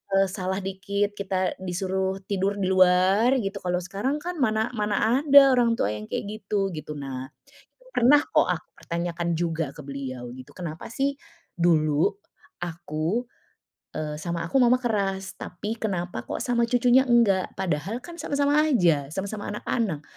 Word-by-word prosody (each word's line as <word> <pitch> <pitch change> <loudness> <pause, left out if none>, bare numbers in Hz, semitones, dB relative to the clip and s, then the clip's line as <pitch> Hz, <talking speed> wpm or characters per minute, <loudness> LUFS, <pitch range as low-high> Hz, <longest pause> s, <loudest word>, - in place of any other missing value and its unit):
eee, 195 0 +4
salah 190 0 -2
dikit 200 +2 -1
kita 190 -2 -1
disuruh 190 +1 -2
tidur 200 +1 -1
di 190 -2 -1
luar, 185 +6 +4
gitu. 195 - -3
Kalau 180 0 -1
sekarang 200 +10 -2
kan 355 -2 -4
mana 220 -1 +1
mana 215 +2 +1
ada 280 -2 +7
orang 240 -2 +3
tua 105 - 0
yang 105 0 -6
kayak - - -3 0.2
gitu, 195 -1 -1
gitu. 155 -1 -6
Nah, 130 -2 -5 0.6
pernah 290 - +5
kok - - +2
aku - - -2
pertanyakan 170 0 -3
juga 160 -3 -1
ke 150 - -9
beliau 130 -3 -6
gitu, 130 +3 -12
"Kenapa 170 -3 -6
sih 275 +1 0 0.4
dulu 155 -3 +3 0.6
aku, 170 +5 -2 0.7
eee, 150 -1 -3
sama 170 +1 -3
aku, 220 +11 +1
Mama 250 0 +5
keras? 195 -4 -1
Tapi 210 +6 -5
kenapa 175 - -3
kok - - -4
sama 235 -1 +1
cucunya 250 +2 +4
enggak? 215 -6 +3
Padahal 190 +7 -2
kan 345 0 -10
sama-sama 285 +1 +1
aja, 170 - +3
sama-sama 200 +2 -4
anak-anak, 205 -8 -2
190 Hz, 150 wpm, -25 LUFS, 170-230 Hz, 0.7 s, ada